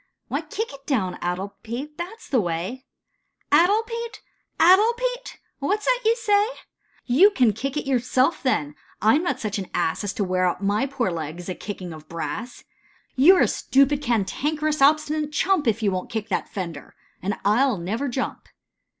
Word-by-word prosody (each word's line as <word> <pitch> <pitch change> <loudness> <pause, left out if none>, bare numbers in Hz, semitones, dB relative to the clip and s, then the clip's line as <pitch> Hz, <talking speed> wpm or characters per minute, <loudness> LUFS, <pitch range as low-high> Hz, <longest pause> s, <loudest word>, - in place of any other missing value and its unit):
" - - -55
Why, - - -1
kick 445 -7 -5
it 275 0 -14
down, 190 -10 0
addlepate, 220 +10 -5
that 355 +6 -5
is - - -14
the 255 -5 +3
way." 185 +10 -4 0.3
" - - -46
'Addlepate, 440 +8 +2 0.4
addlepate,' 475 +7 +3 0.2
what 405 +9 -1
's - - -6
that - - +3
you 450 +1 +4
say? 420 -3 +2 0.2
" - - -47
" - - -34
You 400 +3 +9
can 250 - +3
kick 275 +7 -4
it 300 - -2
yourself 255 +3 +1
then, 150 - 0 0.3
I 215 +2 +4
'm 300 - +3
not 275 -8 -1
such 215 -4 -3
an 190 - -6
ass, 165 +3 0
As 205 - -1
to 205 - -1
wear 185 -1 +1
out 180 +2 -2
my 205 +7 +1
poor 260 -8 -1
legs, 165 +2 -5
a - - -1
kickin' 185 -3 -7
of 155 -1 -13
brass." 205 +8 -5 0.5
"You're 345 +9 +6
a - - +5
stupid, 275 +2 +2
cantankerous, 295 +6 -1
obstinate 300 +1 +3
chump 340 -2 +1
If 225 0 +1
you 200 - +2
won't 185 -1 -3
kick 220 -1 -4
that 190 - -2
fender, 170 -7 -6 0.3
and 200 +3 -1
I 210 +5 +4
11 230 -11 +1
never 225 +9 -2
jump." 260 +1 -4
260 Hz, 190 wpm, -24 LUFS, 195-310 Hz, 0.5 s, You